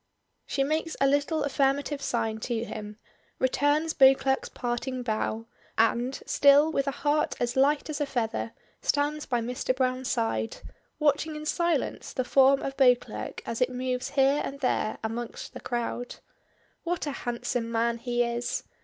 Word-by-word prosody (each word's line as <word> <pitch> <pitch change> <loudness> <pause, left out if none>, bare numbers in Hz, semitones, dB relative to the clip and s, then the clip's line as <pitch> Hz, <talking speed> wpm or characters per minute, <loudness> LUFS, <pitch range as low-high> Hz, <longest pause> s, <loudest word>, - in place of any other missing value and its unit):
She 275 - 0
makes 315 +3 -1
a 275 - +4
little 285 +3 +2
affirmative 280 +1 0
sign 225 -3 -1
to 230 0 -2
him, 210 -1 -7 0.4
returns 290 +4 +2
Beauclerk's 265 0 +4
parting 250 +1 -3
bow, 220 0 -2 0.3
and, 240 +3 +1
still 285 +2 +5
with 275 -2 0
a 275 - -3
heart 295 +1 +2
as 240 0 -1
light 280 +2 +3
as 305 -1 -4
a 290 - 0
feather, 230 -3 -2 0.3
stands 295 +1 0
by 240 -2 0
Mr. 250 +2 -1
Browne's 255 0 0
side, 110 0 -1 0.4
watching 305 +1 +1
in 300 0 -6
silence 340 -2 -1
the 255 - 0
form 270 +1 +5
of 270 - -3
Beauclerk 260 - +2
as 230 +2 -4
it 250 - +3
moves 250 0 -2
here 275 +2 +4
and 275 - -5
there 235 -4 0
amongst 230 +1 -5
the - - -7
crowd. 240 0 -3 0.7
What 345 -1 -2
a 290 - -2
handsome 240 -2 -3
man 235 +1 +1
he 240 0 0
is! 235 0 -2
260 Hz, 155 wpm, -27 LUFS, 240-285 Hz, 0.7 s, still